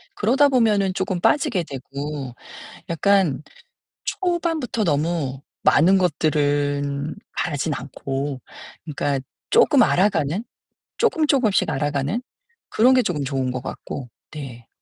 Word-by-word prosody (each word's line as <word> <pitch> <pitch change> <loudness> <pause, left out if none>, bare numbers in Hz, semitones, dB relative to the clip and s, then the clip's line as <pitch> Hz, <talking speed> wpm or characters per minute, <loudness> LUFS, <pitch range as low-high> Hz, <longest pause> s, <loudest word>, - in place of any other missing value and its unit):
그러다 265 +7 +4
보면은 215 -8 +2
쪼금 190 -1 -2
빠지게 220 - +2
되고 140 -1 -6 0.6
약간 170 -4 +2 0.6
초반부터 330 - -1
너무 145 -3 -1 0.2
많은 180 +6 +5
것들은 145 -3 0 0.2
바라진 155 -1 -1
않고 135 +1 -4 0.4
그러니까 145 -3 -1 0.3
쪼끔 280 -5 +6
알아가는, 180 -2 +1 0.5
쪼끔 325 -9 +2
쪼끔씩 235 - +2
알아가는 145 - -1 0.5
그런 245 +4 +4
게 255 - +5
쪼금 175 - -2
좋은 135 -2 -1
것 125 0 -4
같고 130 -1 -6 0.2
네. 125 -6 -9
155 Hz, 245 characters per minute, -22 LUFS, 140-210 Hz, 0.6 s, 쪼끔